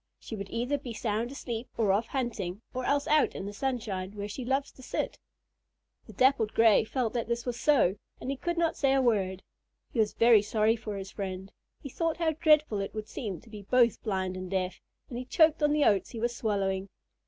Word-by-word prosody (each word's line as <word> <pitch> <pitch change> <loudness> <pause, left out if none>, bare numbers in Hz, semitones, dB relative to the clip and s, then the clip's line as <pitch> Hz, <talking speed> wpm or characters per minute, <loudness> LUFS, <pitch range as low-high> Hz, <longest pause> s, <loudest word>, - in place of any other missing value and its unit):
She 225 - -7
would 200 -2 -6
either 250 +6 -1
be 245 -4 -7
sound 225 +1 -1
asleep, 240 -4 -5
or 215 -4 +3
off 215 +4 +1
hunting, 225 -7 -3
or 255 0 -3
else 285 0 +1
out 305 0 +3
in 195 - -5
the 205 - -5
sunshine, 205 -6 -3
where 205 -1 -5
she 210 +5 -6
loves 270 +3 0
to - - -16
sit." - - -3 0.9
The 220 - -11
Dappled 240 -1 +3
Gray 225 -2 +6
felt 235 0 -2
that 235 -3 -2
this 235 0 -2
was 240 -1 -3
so, 235 -11 +3 0.2
and 265 - -3
he - - -2
could 345 +5 -3
not 335 -1 +1
say 270 -2 +2
a 270 - +4
word. 190 -6 +1 0.5
He 240 - -1
was 215 -1 +2
very 230 -2 +6
sorry 215 +1 +2
for 215 -3 -6
his 195 0 -7
friend. 190 -1 -5 0.3
He 280 - -6
thought 330 +4 -1
how 330 -2 +1
dreadful 305 -7 +3
it 195 +2 -4
would 215 0 -4
seem 195 -9 -5
to - - -18
be 210 -2 -8
both 235 +3 +3
blind 190 -4 -2
and 185 0 -6
deaf, 185 -1 -2 0.3
and 240 - -5
he 255 - -6
choked 315 +4 +4
on 295 0 +4
the 300 -1 +3
oats 200 -2 +3
he 230 - -7
was 240 +1 -1
swallowing. 195 -3 -1
230 Hz, 220 wpm, -29 LUFS, 200-265 Hz, 0.9 s, Gray